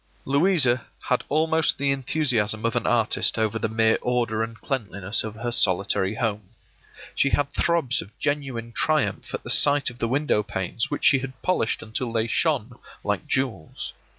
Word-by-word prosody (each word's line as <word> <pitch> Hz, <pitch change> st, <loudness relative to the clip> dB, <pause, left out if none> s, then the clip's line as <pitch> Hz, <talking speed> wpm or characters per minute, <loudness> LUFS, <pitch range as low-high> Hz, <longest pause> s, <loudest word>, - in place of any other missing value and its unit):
Louisa 140 Hz, -4 st, +3 dB, 0.2 s
had 125 Hz, -, +1 dB
almost 160 Hz, +1 st, +2 dB
the 140 Hz, 0 st, +1 dB
enthusiasm 125 Hz, -6 st, 0 dB
of 115 Hz, -, 0 dB
an -, -, 0 dB
artist -, -, +2 dB
over 110 Hz, 0 st, 0 dB
the 110 Hz, -, -1 dB
mere 110 Hz, 0 st, +2 dB
order 120 Hz, -3 st, 0 dB
and 115 Hz, -1 st, -5 dB
cleanliness 100 Hz, -5 st, -3 dB
of 110 Hz, -1 st, -6 dB
her 120 Hz, +2 st, -4 dB
solitary 95 Hz, -1 st, +1 dB
home. 105 Hz, -4 st, -3 dB, 0.6 s
She 140 Hz, -, +2 dB
had 145 Hz, 0 st, 0 dB
throbs 170 Hz, -7 st, +2 dB
of 100 Hz, -, -14 dB
genuine 135 Hz, -6 st, -3 dB
triumph 155 Hz, +4 st, 0 dB
at -, -, -7 dB
the -, -, -1 dB
sight 145 Hz, -2 st, +4 dB
of 120 Hz, -, -16 dB
the 115 Hz, -, 0 dB
window 135 Hz, -2 st, +1 dB
panes 100 Hz, +2 st, -3 dB
which 145 Hz, -, -3 dB
she 135 Hz, -, +6 dB
had 130 Hz, 0 st, -8 dB
polished 185 Hz, -11 st, 0 dB
until 115 Hz, +2 st, -4 dB
they 115 Hz, -1 st, 0 dB
shone 125 Hz, 0 st, -1 dB, 0.2 s
like 105 Hz, -2 st, -2 dB
jewels. 130 Hz, -12 st, -3 dB
120 Hz, 170 wpm, -24 LUFS, 110-140 Hz, 0.6 s, she